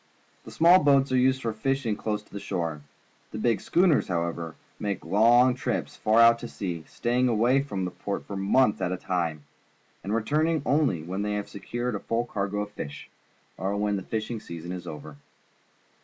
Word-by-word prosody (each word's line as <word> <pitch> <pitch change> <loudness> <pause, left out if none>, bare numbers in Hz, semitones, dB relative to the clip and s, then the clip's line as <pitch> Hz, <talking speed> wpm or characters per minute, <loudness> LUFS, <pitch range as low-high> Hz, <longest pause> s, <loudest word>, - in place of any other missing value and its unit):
The - - -10
small 175 +3 +6
boats 140 -2 +4
are - - +2
used 130 +1 +2
for 115 -1 -1
fishing 130 0 -1
close 105 0 -3
to 100 - -9
shore. 85 -6 -3 0.5
The - - -7
big 115 0 +1
schooners, 175 -5 +3
however, 85 -2 -3 0.2
make 100 -5 -3
long 120 +7 +5
trips 125 - -3
far 110 +1 +2
out 115 0 +7
to 120 - -6
sea, 85 -8 -5
staying 125 +1 0
away 120 +4 +3
from 100 -10 -3
port 100 +2 -5
for 100 - -6
months 105 +4 +2
at 90 - 0
a 95 - -2
time, 85 -5 -2 0.6
and 100 - -4
returning 150 +8 +1
only 140 - +1
when 95 +4 -4
they 105 0 -1
have 105 0 -3
secured 120 +4 -4
a 105 - -2
full 115 +3 -1
cargo 100 -2 -2
of 105 0 -5
fish, 75 -7 -8 0.5
or 95 +3 -2
when 105 0 0
the 95 - -2
fishing 110 +3 -4
season 85 -3 -8
is 90 -1 -6
over. 75 -2 -8
105 Hz, 185 wpm, -27 LUFS, 95-125 Hz, 0.6 s, out